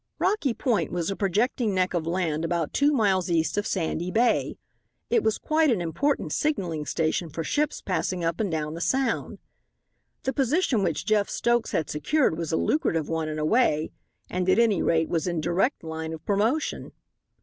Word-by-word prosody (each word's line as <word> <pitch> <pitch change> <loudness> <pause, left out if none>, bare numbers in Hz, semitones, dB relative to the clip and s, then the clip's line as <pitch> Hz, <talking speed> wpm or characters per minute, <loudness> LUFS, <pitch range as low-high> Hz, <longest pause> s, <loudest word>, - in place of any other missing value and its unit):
Rocky 365 - +1
Point 215 - 0
was 175 +1 -1
a - - -2
projecting 210 +2 0
neck 185 0 +1
of 165 -2 -1
land 165 -3 -1
about 165 -2 -1
two 285 +1 +3
miles 195 - +2
east 165 -2 +1
of 205 0 -1
Sandy 175 -1 -2
Bay. 235 +5 +1 0.5
It 465 - +4
was 220 - +1
quite 315 0 +2
an 230 -7 +2
important 270 - -1
signalling 175 - -1
station 165 +1 -1
for 165 +2 -4
ships 295 - -1
passing 185 -1 -1
up 165 0 -1
and 215 -3 0
down 155 -2 -2
the 165 - -6
Sound. 265 +7 0 0.9
The 265 - -1
position 270 - +1
which 170 -5 -1
Jeff 215 -2 +2
Stokes 235 -1 +1
had 160 - 0
secured 250 - +1
was 165 -1 -4
a 160 - +1
lucrative 165 - 0
one 160 -1 -1
in 155 - -4
a 155 - -1
way, 160 -6 +2 0.4
and, 180 0 -1
at 185 - +4
any 225 -6 +3
rate, 160 -1 +2
was 165 +1 -1
in 170 -2 -1
direct 175 - 0
line 160 0 -5
of 160 0 -9
promotion. 220 +10 0
185 Hz, 185 wpm, -26 LUFS, 165-240 Hz, 0.9 s, It